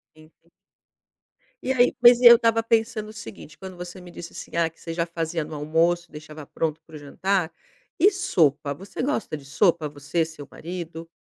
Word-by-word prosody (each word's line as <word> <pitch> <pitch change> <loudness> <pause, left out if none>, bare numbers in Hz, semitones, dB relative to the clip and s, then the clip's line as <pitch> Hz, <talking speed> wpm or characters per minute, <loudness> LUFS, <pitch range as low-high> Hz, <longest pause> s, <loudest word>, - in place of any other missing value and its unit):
Uhum. 155 +1 -22 1.1
E 265 - 0
aí, 245 -1 +4
pois 240 0 +7
e - - +2
eu 235 0 +12
estava 230 -1 +2
pensando 225 -1 0
o - - -11
seguinte, 145 - -11
quando 190 -1 -9
você 180 +1 -8
me 180 -1 -12
disse 170 0 -9
assim, - - -10
ah, 170 -1 +2
que 165 - -29
você 165 - -6
já 170 0 -1
fazia 165 -1 -3
no 155 +1 -8
almoço, 165 +3 0
deixava 150 0 -10
pronto 160 +2 -3
para 160 - -14
o 150 - -8
jantar. 180 +4 -1 0.5
E 400 +5 +6
sopa? 155 - +1
Você 195 +6 -7
gosta 250 - -2
de 145 - -10
sopa, 160 +1 +1
você, 145 +3 -2
seu 160 -3 -9
marido? 170 -1 -7
170 Hz, 190 wpm, -24 LUFS, 155-200 Hz, 1.1 s, eu